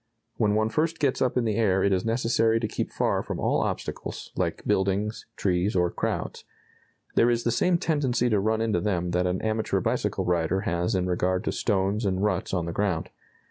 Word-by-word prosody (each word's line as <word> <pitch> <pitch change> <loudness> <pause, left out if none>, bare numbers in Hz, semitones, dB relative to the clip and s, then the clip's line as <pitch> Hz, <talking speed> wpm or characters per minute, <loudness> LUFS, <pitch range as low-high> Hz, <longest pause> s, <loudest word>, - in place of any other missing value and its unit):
When 105 -2 +2
one 110 0 +2
first 160 +6 0
gets 140 -4 0
up 130 -1 +1
in 120 - +2
the 110 -2 0
air 95 -4 +2
it 100 - +3
is 95 - +1
necessary 115 -1 +2
to 110 - -1
keep - - -3
far - - 0
from - - -5
all - - +1
obstacles, - - -4
like - - -2
buildings, 100 +3 0
trees, 95 +2 0
or 90 -1 +2
crowds. - - -3 0.7
There 120 - +4
is 120 -1 +1
the 120 - +1
same 175 +9 +2
tendency 135 -7 +1
to 110 -4 +2
run 110 +2 +1
into 110 -5 +1
them 90 -3 -1
that 90 +1 +1
an 90 +1 -2
amateur 110 0 0
bicycle - - -1
rider 90 +2 +1
has 90 +3 -1
in 90 -1 +1
regard 90 +1 0
to - - -1
stones 100 +1 0
and 95 -1 0
ruts 105 - 0
on 90 -3 -1
the 85 - -3
ground. 90 -3 -1
105 Hz, 205 wpm, -26 LUFS, 90-115 Hz, 0.7 s, There